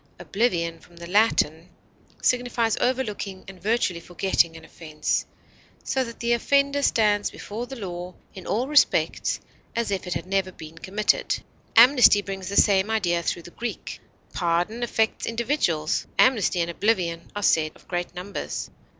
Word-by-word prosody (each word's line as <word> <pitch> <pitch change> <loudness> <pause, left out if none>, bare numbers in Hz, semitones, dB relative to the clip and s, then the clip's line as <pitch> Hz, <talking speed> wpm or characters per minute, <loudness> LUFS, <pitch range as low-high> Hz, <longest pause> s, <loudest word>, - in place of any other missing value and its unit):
Oblivion, 170 -2 -1
from 175 - -20
the 170 0 -9
Latin, 175 -4 +2 0.5
signifies 245 -3 +1
overlooking 215 -7 -2
and 195 -2 -11
virtually 210 -5 0
forgetting 170 -1 0
an 160 - -13
offense, 155 -2 -3 0.6
so 265 - 0
that 235 -2 -9
the 235 0 +1
offender 280 +4 +2
stands 210 -5 +2
before 230 +4 -7
the 270 - -7
law 180 -5 -6 0.2
in 190 - -10
all 235 +6 0
respects 295 0 +2 0.4
as 230 -3 -1
if 190 -2 -2
it 180 - -2
had - - -4
never 190 0 0
been 160 -2 -11
committed. 210 - 0 0.3
Amnesty 235 -3 +7
brings 195 -2 -6
the 200 - -4
same 195 0 +4
idea 175 -6 +1
through 170 0 -2
the 175 - -12
Greek. 240 +5 -6 0.3
Pardon 175 +6 0
affects 225 -2 0
individuals; 230 - 0
amnesty 220 -8 +3
and 170 0 -1
oblivion 170 -4 -1
are 205 - -3
said 155 -4 +3
of - - -21
great 175 0 -3
numbers. 185 +3 -5
200 Hz, 150 wpm, -25 LUFS, 175-235 Hz, 0.6 s, Amnesty